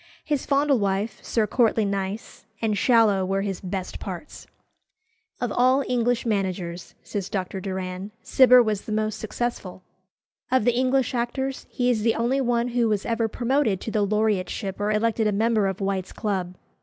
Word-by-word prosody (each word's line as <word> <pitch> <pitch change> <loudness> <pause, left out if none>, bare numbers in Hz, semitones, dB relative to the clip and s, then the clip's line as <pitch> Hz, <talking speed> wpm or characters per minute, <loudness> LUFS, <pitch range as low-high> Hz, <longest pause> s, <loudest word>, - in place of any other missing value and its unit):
His 295 -3 -1
Fondlewife, 230 -8 +1
Sir 225 -2 +1
Courtly 220 0 +2
Nice, 200 +2 -4
and 220 -2 0
Shallow 220 -4 +4
were 195 +1 -1
his 195 -2 -3
best 185 0 -5
parts. 190 - -8 0.9
"Of 245 -3 -2
all 255 +4 +3
English 245 -1 +1
managers," 185 -5 -2
says 200 -2 -4
Dr. 190 -1 -3
Doran, 185 0 -4
"Cibber 250 -1 +6
was 215 -3 -1
the - - -6
most 215 0 -1
successful. 220 -5 -4 0.7
Of 260 -4 +2
the 245 - +4
English 260 +1 +1
actors, 265 +3 -2
he 250 0 +1
is 225 -3 0
the 225 +1 +2
only 245 +4 +1
one 240 -1 +1
who 240 -2 +1
was 210 -2 0
ever 230 -1 0
promoted 235 -3 0
to 225 - -4
the 215 - +1
laureateship 205 -2 -1
or 205 - 0
elected 220 +1 +1
a - - +2
member 215 0 +2
of 190 0 -3
White's 195 -1 -2
Club." 190 -5 -2
215 Hz, 165 wpm, -24 LUFS, 195-240 Hz, 0.9 s, Cibber